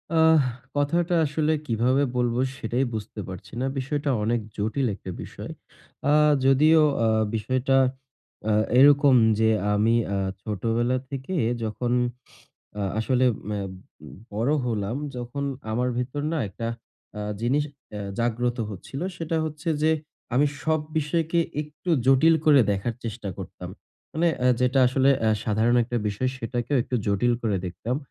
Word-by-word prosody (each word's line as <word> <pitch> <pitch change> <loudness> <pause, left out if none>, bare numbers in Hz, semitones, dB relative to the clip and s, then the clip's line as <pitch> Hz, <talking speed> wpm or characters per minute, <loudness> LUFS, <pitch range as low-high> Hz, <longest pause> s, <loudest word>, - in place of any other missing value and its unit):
আহ 160 -1 +6 0.4
কথাটা 170 +5 +1
আসলে 155 +1 0
কিভাবে 125 +5 +2
বলব? 120 -1 +1 0.2
সেটাই 120 +4 -1
বুঝতে 110 0 -6
পারছি 95 +2 -9
না, - - 0
বিষয়টা 145 +2 -2
অনেক 120 +2 +1 0.2
জটিল 110 +6 0
একটা 95 - -8
বিষয়। - - -8 0.6
আ - - +4 0.3
যদিও 155 +4 +5 0.2
আ - - +3 0.3
বিষয়টা 130 +4 +1 0.7
আ - - +3 0.3
এরকম 140 -1 +6 0.2
যে 110 0 +4 0.2
আমি 110 +3 +3 0.2
আ - - 0 0.2
ছোটবেলা 115 +5 0
থেকে 135 +7 -5 0.3
যখন 120 +3 -2 0.9
আ - - -1 0.2
আসলে 130 +3 +2
আম 100 -2 -5 0.6
বড় 115 +8 0
হলাম 110 +1 -2 0.2
যখন 125 +4 -4 0.3
আমার 125 +3 0
ভেতর 130 +4 -3
না 165 - -1
আ - - -1
একটা 115 +4 -6 0.7
জিনিস 135 +5 +1 0.3
আ - - -4 0.2
জাগ্রত 120 +1 0
হচ্ছিল 120 +8 -7 0.2
সেটা 165 0 -2
হচ্ছে 155 +2 -5 0.2
যে, 160 - +5 0.4
আমি 145 +3 +4 0.2
সব 155 +1 +1 0.2
বিষয়কে 165 +2 0 0.2
একটু 150 +4 -7 0.2
জটিল 135 +5 +6
করে 145 -3 +7
দেখার 100 +4 -1
চেষ্টা 110 -2 -5
করতাম। - - -8 0.4
মানে 170 +2 +2 0.3
যেটা 125 +2 +2
আসলে 135 +2 +3 0.2
আ - - +4 0.2
সাধারণ 110 +2 +2
একটা 120 +1 -3
বিষয় 115 +6 -1
সেটাকেও 120 +3 -2
একটু 125 - -2
জটিল 100 +5 +2
করে 105 -4 +1
দেখতাম। 115 +8 -3
125 Hz, 140 wpm, -25 LUFS, 115-145 Hz, 0.9 s, করে